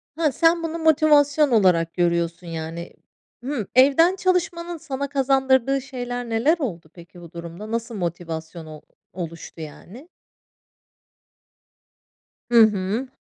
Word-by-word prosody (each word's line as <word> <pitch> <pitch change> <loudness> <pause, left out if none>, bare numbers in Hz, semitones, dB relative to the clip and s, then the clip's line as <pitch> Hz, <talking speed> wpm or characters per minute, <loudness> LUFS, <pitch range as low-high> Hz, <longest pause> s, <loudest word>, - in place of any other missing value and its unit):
Hıh, 315 -2 +1
sen 330 +4 +2
bunu 330 0 -3
motivasyon 300 -2 +4
olarak 180 -7 +3
görüyorsun, 170 0 -1
yani. 165 +1 -6 0.5
Hı, 250 -6 -3
evden 285 +8 +5
çalışmanın 350 -2 -1
sana 280 -3 -5
kazandırdığı 270 -1 +2
şeyler 245 -2 -6
neler 235 +9 +2
oldu 175 - -5
peki, 175 0 -15
bu 170 -2 -12
durumda? 170 +5 -9
Nasıl 230 0 -3
motivasyon 165 -2 -5
ol 155 -1 -11 0.3
oluştu, 165 -2 -8
yani? 195 - -11 2.4
Hı 235 -1 +7
hı. 210 +3 +1
235 Hz, 115 wpm, -22 LUFS, -, 2.4 s, Hı